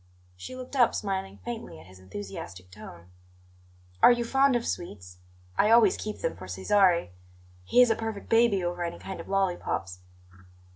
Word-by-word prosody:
She 90 - -9
looked 255 +2 -8
up, 245 -3 +4
smiling 195 -1 -3
faintly 230 - -6
at 80 - -15
his 95 0 -16
enthusiastic 95 -1 -9
tone. 90 -2 -12 0.9
"Are - - +9
you 240 -1 +1
fond 270 +2 +3
of 235 - -1
sweets? 90 - -6 0.4
I 210 - +4
always 225 -3 +6
keep 215 -1 -6
them - - -1
for 90 +1 -10
Cesare; 170 - +2 0.5
he 250 - +6
is 240 - +2
a - - +2
perfect 225 -2 -5
baby 225 -4 +3
over 175 0 -2
any 170 - -4
kind 190 - -8
of - - -9
lollipops." 175 - -1
190 Hz, 165 wpm, -27 LUFS, -, 0.9 s, Are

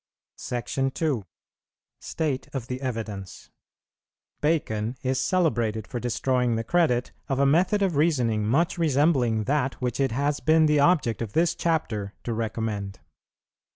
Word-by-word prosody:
SECTION 135 +2 -2
II. 140 - 0 0.7
STATE 145 -5 -3
OF 130 -4 -3
THE 125 +1 -5
EVIDENCE. 110 -7 -5 0.9
Bacon 125 -7 0
is 130 0 0
celebrated 120 - +1
for 120 - -5
destroying 125 0 0
the 115 - -1
credit 125 -5 +1 0.2
of 135 - 0
a 140 - +3
method 180 +8 +3
of 185 -5 +1
reasoning 125 -9 +2
much 160 +11 +1
resembling 135 -7 +2
that 135 +1 0
which 125 -1 -3
it 135 -3 +2
has 140 +4 0
been 160 0 +4
the 150 -1 +3
object 145 -8 +2
of 110 -3 -4
this 170 +1 +3
Chapter 110 -12 -2
to 120 - -2
recommend. 110 -3 -3
130 Hz, 140 wpm, -26 LUFS, 115-155 Hz, 0.9 s, been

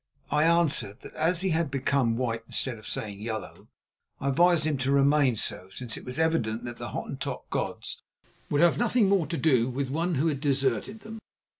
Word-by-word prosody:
I 150 +2 +3
answered 160 -11 +2
that - - -11
as 165 +2 +1
he 190 - +1
had 165 -2 +1
become 135 -3 +1
white 115 -2 -1
instead 125 -4 -3
of 110 - -10
staying 105 -2 -4
yellow, 110 0 -6 0.5
I 140 - -1
advised 170 +3 +4
him 150 -3 0
to 135 +1 0
remain 140 -2 +4
so, 95 -2 -2
since 115 +3 -5
it - - -9
was 125 0 -4
evident 140 -9 +1
that 120 -1 -6
the - - -6
Hottentot - - -5
gods - - -3 0.5
would 145 - +2
have 175 -1 +4
nothing 240 -2 +3
more 190 -6 +2
to 165 - -3
do 130 -7 +3
with 130 +1 -3
one 165 +3 0
who 140 +4 +1
had 145 -4 0
deserted 140 - 0
them. 220 +1 -9
140 Hz, 195 wpm, -27 LUFS, 120-165 Hz, 0.5 s, advised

